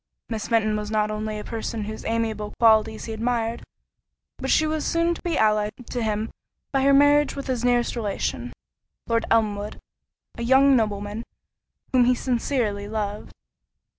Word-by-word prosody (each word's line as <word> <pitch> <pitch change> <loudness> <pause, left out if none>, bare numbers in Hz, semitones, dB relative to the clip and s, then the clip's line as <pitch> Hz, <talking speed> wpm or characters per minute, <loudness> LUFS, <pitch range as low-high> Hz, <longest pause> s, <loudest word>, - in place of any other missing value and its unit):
Miss 225 -2 -3
Fenton 215 -2 +2
was 210 0 -3
not 215 -1 +1
only 215 0 -3
a 210 - -6
person 225 -1 -4
whose 215 +1 -6
amiable 220 -2 -2
qualities 220 -1 +4
he 225 - -5
admired, 230 0 -1 0.8
but - - -3
she 310 - +4
was 310 -1 -1
soon 335 +1 +1
to - - -9
be 340 -3 -1
allied 215 -1 +2 0.2
to 245 - -2
him 215 0 -1 0.4
by 270 - +1
her 275 +1 +4
marriage 290 +1 +5
with 275 - -5
his 255 -3 -2
nearest 245 -1 +2
relation, 200 - -3 0.5
Lord 230 0 0
Elmwood, 210 -2 0 0.6
a - - -3
young 265 +3 +5
nobleman 210 -1 -1 0.7
whom 250 -2 +5
he 250 +1 +4
sincerely 235 -5 -1
loved. 210 -1 -4
225 Hz, 160 wpm, -24 LUFS, 215-250 Hz, 0.8 s, marriage